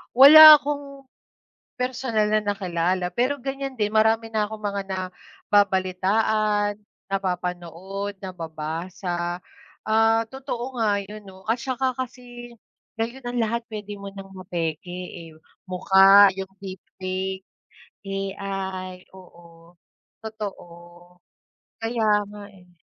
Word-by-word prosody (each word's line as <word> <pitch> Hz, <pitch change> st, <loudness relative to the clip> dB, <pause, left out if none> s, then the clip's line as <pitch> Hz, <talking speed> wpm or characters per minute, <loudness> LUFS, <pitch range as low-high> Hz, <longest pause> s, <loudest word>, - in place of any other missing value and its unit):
Wala 305 Hz, +3 st, +11 dB
akong 280 Hz, -2 st, -6 dB, 0.7 s
personal 250 Hz, -4 st, -1 dB
na 215 Hz, -, +3 dB
nakilala 185 Hz, -3 st, -1 dB
pero 250 Hz, +4 st, +1 dB
ganiyan 270 Hz, 0 st, -4 dB
din 210 Hz, -4 st, -1 dB
marami 220 Hz, +1 st, +2 dB
na 215 Hz, -1 st, 0 dB
akong 215 Hz, 0 st, -9 dB
mga 200 Hz, -1 st, -2 dB
nababalitaan, 200 Hz, +2 st, 0 dB, 0.3 s
napapanood, 185 Hz, +1 st, -4 dB
nababasa. 175 Hz, +1 st, -5 dB, 0.4 s
Ah, 225 Hz, +1 st, +3 dB
totoo 260 Hz, -2 st, -6 dB
nga 205 Hz, -2 st, +1 dB
'yon 210 Hz, +1 st, -11 dB
'no 190 Hz, 0 st, -14 dB
at 230 Hz, -, +1 dB
saka 260 Hz, +1 st, -1 dB
kasi 245 Hz, -1 st, -8 dB, 0.4 s
ngayon 235 Hz, +3 st, -4 dB
ang 245 Hz, 0 st, -3 dB
lahat 230 Hz, +1 st, -2 dB
puwede 210 Hz, -2 st, -7 dB
mo 200 Hz, -, -9 dB
ng 195 Hz, -1 st, -10 dB
mapeke, 170 Hz, -3 st, -4 dB, 0.4 s
eh. -, -, -13 dB, 0.4 s
Mukha, 195 Hz, +2 st, +6 dB
yung 190 Hz, 0 st, -4 dB
deep 190 Hz, -1 st, -7 dB, 0.2 s
fake, 190 Hz, +1 st, -3 dB, 0.6 s
AI 195 Hz, -1 st, -5 dB
oo, 170 Hz, -2 st, -17 dB, 0.5 s
totoo. 215 Hz, -4 st, -7 dB, 1.2 s
Kaya 225 Hz, -2 st, +1 dB
nga, 205 Hz, 0 st, -10 dB
eh. 180 Hz, -2 st, -19 dB
205 Hz, 110 wpm, -24 LUFS, 185-225 Hz, 1.2 s, Wala